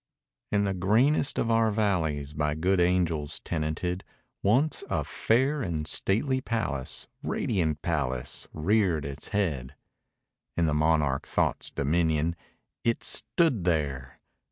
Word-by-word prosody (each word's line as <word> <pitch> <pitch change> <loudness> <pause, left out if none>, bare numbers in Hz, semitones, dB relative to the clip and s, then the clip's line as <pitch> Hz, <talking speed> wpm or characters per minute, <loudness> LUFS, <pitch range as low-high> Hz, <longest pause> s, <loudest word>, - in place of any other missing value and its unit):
In 100 0 +3
the 100 -1 0
greenest 115 - +2
of 115 - +1
our 115 0 +4
valleys 80 -9 0
By 75 -1 0
good 90 +4 +2
angels 85 -4 +1
tenanted, 85 +3 -2 0.4
Once 135 +9 +2
a - - 0
fair 135 +6 +1
and 80 -8 -2
stately 125 - 0
palace 70 - -3
Radiant 80 -8 -1
palace 70 -6 -2
reared 85 -2 +1
its 70 +1 -6
head. 75 -10 -1 0.8
In 85 - +3
the 75 - +1
monarch 75 -3 +2
Thought's - - 0
dominion 80 +2 +1 0.5
It 115 -2 +1
stood 120 - 0
there! 70 -7 -1
85 Hz, 120 wpm, -28 LUFS, 75-105 Hz, 0.8 s, our